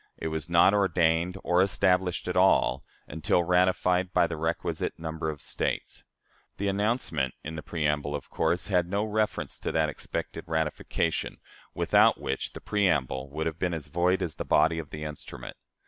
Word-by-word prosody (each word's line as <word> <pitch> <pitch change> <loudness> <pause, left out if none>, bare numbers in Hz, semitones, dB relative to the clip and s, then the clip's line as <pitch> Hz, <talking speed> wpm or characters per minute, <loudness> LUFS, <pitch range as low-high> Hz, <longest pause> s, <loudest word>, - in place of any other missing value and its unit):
It 80 - -3
was 80 0 -4
not 85 +3 +5
ordained 90 -3 +2
or 90 +1 +3
established 90 -1 +1
at - - -2
all, - - +3 0.2
until 80 +3 +1
ratified 90 +1 +2
by - - +4
the 85 - -3
requisite 80 +2 -2
number 80 -1 -4
of 75 -2 -6
States. - - -3 0.5
The 100 - -1
announcement 100 - 0
in 80 +1 -6
the 80 - -5
preamble 75 -3 -1
of 75 - -7
course 85 -1 0
had 90 -2 +1
reference 105 +1 -1
to - - -3
that 80 -1 +2
expected - - -5
ratification, 80 -1 -1 0.4
without - - +4
which - - -3
the - - -9
preamble 70 -10 0
would 80 +3 -3
have 80 0 -3
been 90 -2 0
as 75 -3 -6
void 90 +2 +1
as 80 -4 -4
the - - -3
body 80 +2 +3
of 75 -3 -7
the 75 0 -7
instrument. 75 -5 -8
85 Hz, 165 wpm, -28 LUFS, 80-90 Hz, 0.5 s, not